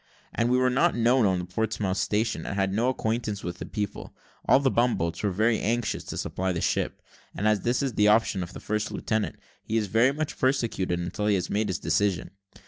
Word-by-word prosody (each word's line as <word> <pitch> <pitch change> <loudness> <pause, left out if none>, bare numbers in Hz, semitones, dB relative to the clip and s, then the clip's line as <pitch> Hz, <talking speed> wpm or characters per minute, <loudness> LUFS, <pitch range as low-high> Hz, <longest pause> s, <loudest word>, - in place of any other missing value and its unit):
As 115 - +1
we 125 +1 +3
were 130 0 +3
not 130 +2 +3
known 120 -1 +3
on 95 -1 +1
the 90 - -3
Portsmouth 100 0 -1
station, 110 +2 0
and - - -4
had 95 -1 0
no 115 +5 +2
acquaintance 110 -4 -2
with 90 0 -5
the - - -6
people, 105 -2 -5 0.3
all - - +7
the 135 -2 +2
bum 120 +1 +2
boats 85 0 -2
were 105 - +1
very 110 +4 +2
anxious 115 0 -1
to - - -6
supply 95 0 -2
the 85 - -2
ship; - - -1 0.3
and 105 - 0
as 105 -1 +3
this 120 +6 0
is 135 - 0
at - - -16
the 105 - +5
option 105 -2 +3
of 90 - -6
the - - -8
first 105 0 -2
lieutenant, 110 -1 -1 0.3
he 110 - -2
is 110 - +1
very 115 +6 +3
much 150 +1 -4
persecuted 115 -9 0
until 90 +4 -3
he 105 - +4
has 90 - -2
made 105 +1 +1
his 95 - -1
decision. 90 +4 0
105 Hz, 230 wpm, -26 LUFS, 95-120 Hz, 0.3 s, all